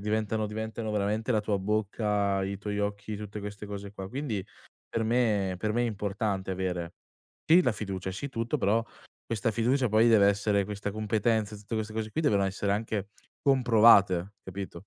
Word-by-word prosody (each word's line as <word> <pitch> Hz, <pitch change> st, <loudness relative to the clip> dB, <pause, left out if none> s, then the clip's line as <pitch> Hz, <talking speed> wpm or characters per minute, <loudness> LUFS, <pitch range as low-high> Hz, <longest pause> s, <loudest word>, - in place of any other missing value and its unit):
diventano 110 Hz, +1 st, -1 dB
diventano 110 Hz, +1 st, -4 dB
veramente 105 Hz, +3 st, 0 dB
la 110 Hz, -, +2 dB
tua 105 Hz, -1 st, -1 dB
bocca, 105 Hz, -1 st, 0 dB
i 100 Hz, +1 st, -3 dB
tuoi 105 Hz, 0 st, -3 dB
occhi, 100 Hz, +1 st, -3 dB
tutte 105 Hz, 0 st, -7 dB
queste 105 Hz, +1 st, -7 dB
cose 100 Hz, -1 st, -7 dB
qua, 95 Hz, -2 st, -7 dB
quindi 120 Hz, -7 st, -3 dB, 0.4 s
per 115 Hz, -, -1 dB
me 110 Hz, -5 st, +1 dB
per 105 Hz, +1 st, -1 dB
me 120 Hz, +2 st, +1 dB
è -, -, +1 dB
importante 100 Hz, -2 st, -2 dB
avere 90 Hz, -2 st, -3 dB, 0.5 s
sì 170 Hz, +3 st, +7 dB
la 125 Hz, -, +2 dB
fiducia, 95 Hz, -3 st, -4 dB
sì 105 Hz, +9 st, -5 dB
tutto, 115 Hz, +4 st, -1 dB
però 110 Hz, +2 st, +2 dB, 0.4 s
questa 115 Hz, -1 st, 0 dB
fiducia 120 Hz, +4 st, +1 dB
poi 110 Hz, +2 st, +5 dB
deve 105 Hz, -3 st, +6 dB
essere 100 Hz, 0 st, +1 dB
questa 105 Hz, +1 st, -4 dB
competenza, 110 Hz, 0 st, 0 dB
e 105 Hz, -, -9 dB
tutte 105 Hz, +3 st, -6 dB
queste 110 Hz, 0 st, -3 dB
cose 110 Hz, 0 st, -3 dB
qui, 160 Hz, -, -2 dB
devono 100 Hz, -8 st, +3 dB
essere 100 Hz, +1 st, -1 dB
anche 105 Hz, -1 st, -2 dB, 0.3 s
comprovate, 110 Hz, -8 st, +5 dB
capito? 95 Hz, -1 st, -7 dB
105 Hz, 180 wpm, -29 LUFS, 100-110 Hz, 0.5 s, sì